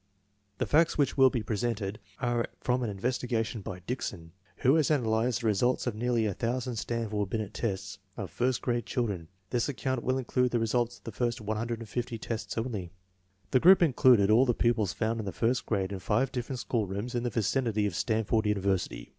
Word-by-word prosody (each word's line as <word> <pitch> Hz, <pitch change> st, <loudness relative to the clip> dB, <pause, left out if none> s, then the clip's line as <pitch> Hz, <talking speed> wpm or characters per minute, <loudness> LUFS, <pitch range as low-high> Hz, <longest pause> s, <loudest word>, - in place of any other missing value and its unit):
The -, -, 0 dB
facts 160 Hz, +2 st, +3 dB
which 145 Hz, -2 st, +2 dB
will 135 Hz, -1 st, +7 dB
be 120 Hz, -4 st, -2 dB
presented 110 Hz, -1 st, -2 dB, 0.2 s
are 120 Hz, -1 st, 0 dB
from 125 Hz, 0 st, 0 dB
an 120 Hz, -, -1 dB
investigation 115 Hz, +1 st, -2 dB
by 90 Hz, -1 st, -7 dB
Dickson, 95 Hz, -6 st, -5 dB, 0.2 s
who 130 Hz, -, +3 dB
has 155 Hz, -2 st, +3 dB
analyzed 120 Hz, -3 st, +1 dB
the -, -, -3 dB
results 110 Hz, +4 st, +2 dB
of 120 Hz, -, -1 dB
nearly 115 Hz, +1 st, 0 dB
a 105 Hz, -, 0 dB
thousand 125 Hz, +3 st, -2 dB
Stanford 105 Hz, -3 st, -2 dB
Binet 110 Hz, -2 st, -3 dB
tests 95 Hz, -3 st, -3 dB, 0.2 s
of 95 Hz, -6 st, -5 dB
first 125 Hz, +4 st, 0 dB
grade 120 Hz, -1 st, -1 dB
children. 100 Hz, -10 st, -2 dB, 0.2 s
This 120 Hz, +2 st, +1 dB
ac 140 Hz, -, -3 dB
count 130 Hz, -3 st, -1 dB
will 130 Hz, +1 st, +1 dB
include 125 Hz, -1 st, 0 dB
the 120 Hz, -, +3 dB
results 120 Hz, +1 st, 0 dB
of -, -, -26 dB
the 115 Hz, -, -6 dB
first 120 Hz, +2 st, -1 dB
150 115 Hz, +2 st, -3 dB
tests 115 Hz, +1 st, -5 dB
only. 110 Hz, -7 st, -3 dB, 0.6 s
The 130 Hz, -, +5 dB
group 185 Hz, +5 st, +7 dB
included 125 Hz, -8 st, +5 dB
all 125 Hz, +5 st, +5 dB
the 120 Hz, -, +2 dB
pupils 110 Hz, -5 st, +2 dB
found 115 Hz, 0 st, -1 dB
in 105 Hz, -, -4 dB
the -, -, -2 dB
first 120 Hz, +8 st, 0 dB
grade 100 Hz, -3 st, 0 dB
in 100 Hz, -, -4 dB
five 120 Hz, +7 st, +1 dB
different 125 Hz, +1 st, -3 dB
schoolrooms 110 Hz, -1 st, -2 dB
in 120 Hz, -, 0 dB
the 120 Hz, -, -1 dB
vicinity 110 Hz, 0 st, 0 dB
of 100 Hz, -, -1 dB
Stanford 110 Hz, +1 st, +1 dB
University. 100 Hz, -2 st, -1 dB
115 Hz, 195 wpm, -29 LUFS, 105-125 Hz, 0.6 s, will